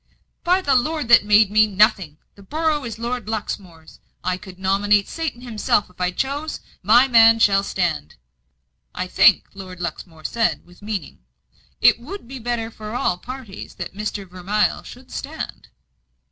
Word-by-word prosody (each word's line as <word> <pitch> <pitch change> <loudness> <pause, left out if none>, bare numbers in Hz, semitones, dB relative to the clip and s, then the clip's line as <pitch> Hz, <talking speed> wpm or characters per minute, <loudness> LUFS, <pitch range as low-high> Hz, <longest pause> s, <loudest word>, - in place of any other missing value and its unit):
"By 365 +2 +3
the 280 - +2
Lord 295 +1 0
that 235 -3 +7
made 210 -1 +5
me, 215 0 +5
nothing! 195 -6 +2 0.2
The 200 - -17
borough 305 +6 -1
is 225 -2 -6
Lord 235 -2 -4
Luxmore's; 185 -7 -6 0.2
I 185 - 0
could 185 -1 -12
nominate 200 +2 +2
Satan 320 -7 -4
himself 215 -4 0
if 180 - -13
I 180 - +2
chose. 280 +10 -3 0.2
My 235 +7 +5
man 225 -2 +6
shall 200 -3 +4
stand." 175 - -2 0.8
"I - - -2
think," - - +5
Lord 185 -2 -10
Luxmore 165 -1 -7
said, 230 -1 0
with 175 +2 -20
meaning, 205 -6 -5 0.6
"it - - +6
would 305 +5 -9
be 265 +1 -8
better 235 -1 -3
for 215 +1 -8
all 180 -7 0
parties 250 -3 -9
that 175 - -7
Mr. 205 0 -4
Vermilye 185 +4 -1
should - - -13
stand." - - -7
210 Hz, 160 wpm, -21 LUFS, 190-240 Hz, 0.8 s, that